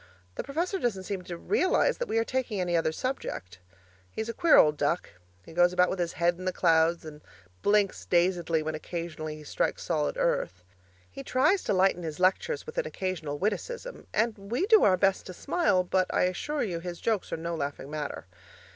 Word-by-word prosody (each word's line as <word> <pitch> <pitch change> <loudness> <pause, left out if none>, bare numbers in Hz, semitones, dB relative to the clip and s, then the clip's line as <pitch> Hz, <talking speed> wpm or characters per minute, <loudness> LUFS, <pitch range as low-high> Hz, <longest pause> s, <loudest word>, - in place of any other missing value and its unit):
The - - -4
professor 340 +8 -2
doesn't 205 - -1
seem 190 0 -4
to 175 - -6
realize 400 - +1
that - - -2
we - - -1
are 225 - +3
taking 245 -4 -2
any 175 -1 0
other 165 -1 +2
subject. 95 - -4 0.5
He's 220 - -5
a - - -2
queer 330 +6 +5
old 150 0 +6
duck; 150 +4 -1 0.3
he - - -12
goes 175 +1 +4
about 180 0 +3
with 190 - -3
his 170 -1 -1
head 175 +1 +1
in 185 - -7
the 185 - +1
clouds 165 -1 +2
and 150 -1 -10 0.4
blinks 205 -1 +2
dazedly 175 -2 +2
when 155 0 -3
occasionally 155 -1 -5
he 155 - -11
strikes - - -2
solid 75 -1 -1
earth. 90 0 -1 0.5
He 115 - -8
tries 365 - +2
to - - +1
lighten 185 -1 +3
his 160 -1 -5
lectures 330 - +1
with 465 +2 -4
an - - -1
occasional 170 -6 -3
witticism 475 - -4
and 225 +1 +1
we 230 - -1
do 440 0 +6
our 185 -2 +5
best 195 +1 +1
to 185 - -7
smile, 255 - +1
but 185 +1 0
I - - +2
assure 285 +12 -1
you 180 -7 -3
his 175 0 -6
jokes 220 -4 -1
are - - -2
no 170 +1 -4
laughing 145 -2 -4
matter. 150 -2 -5
180 Hz, 200 wpm, -28 LUFS, 165-230 Hz, 0.5 s, old